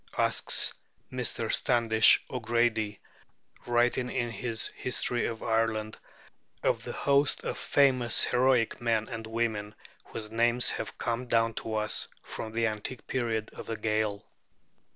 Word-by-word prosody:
asks - - +2 0.4
Mr. 120 -3 -1
Standish 115 -4 +4
O'Grady, 115 -3 0 0.7
writing 120 +1 +2
in 120 -2 -2
his 115 +1 -2
'History 125 -1 -1
of 115 -1 -5
Ireland' 110 -1 0 0.6
of - - +1
the - - -5
host 140 0 +2
of - - -2
famous 130 -4 +3
heroic 125 -2 +2
men 115 -2 +1
and 115 -1 -6
women 110 -2 -2 0.3
whose 110 -1 -7
names 120 +2 +2
have 110 - -5
come 120 +1 -2
down 115 -1 +2
to 110 0 -4
us 105 0 0 0.2
from 110 - -6
the 115 +1 0
antique 110 +3 -4
periods 115 -4 -2
of - - -9
the 115 - -3
Gael. 110 -1 -1
115 Hz, 130 wpm, -29 LUFS, 110-120 Hz, 0.7 s, Standish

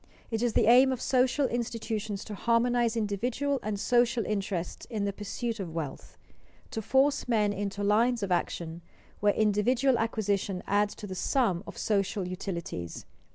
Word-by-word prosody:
It 225 -1 -1
is 240 -2 +1
the - - +4
aim 255 +4 +7
of 255 - -2
social 260 +3 +2
institutions 225 -4 -3
to 215 - -7
harmonize 235 +2 +2
individual 245 +7 -1
and 210 -2 -3
social 240 0 +2
interests 195 -4 -3
in 215 -4 -2
the 200 - -1
pursuit 225 +3 -4
of 170 -4 -5
wealth, 150 -5 -6 0.5
to 220 - -3
force 265 +6 +2
men 210 -4 +2
into 205 0 -3
lines 225 +3 +3
of 195 - -2
action 170 -1 -2 0.4
where 205 0 +3
individual 235 +5 +2
acquisition 205 -4 -1
adds 205 +1 +1
to - - -8
the 190 - -6
sum 190 -2 +1
of - - -9
social 195 -2 0
utilities. 170 - -5
215 Hz, 155 wpm, -29 LUFS, 200-240 Hz, 0.5 s, aim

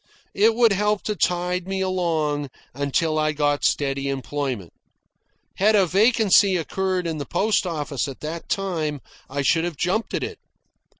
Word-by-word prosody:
It 220 +3 +3
would 230 -3 +4
help 210 +1 0
to 210 - -2
tide 180 0 0
me 195 0 -2
along 160 -6 -1 0.2
until 155 +3 0
I 155 0 +1
got 145 -1 0
steady 140 -1 0
employment. 135 - -3 0.8
Had 215 +3 +4
a 195 -2 +5
vacancy 200 0 +4
occurred 185 +2 -2
in 160 -2 -3
the 145 - -4
post 200 +1 +1
office 145 -4 -2
at 135 - -9
that 160 +2 -6
time, 160 -7 -2 0.3
I 140 +1 -2
should 160 +5 +3
have 170 -4 -3
jumped 190 +6 -1
at - - -2
it. - - -6
170 Hz, 160 wpm, -23 LUFS, 145-195 Hz, 0.8 s, a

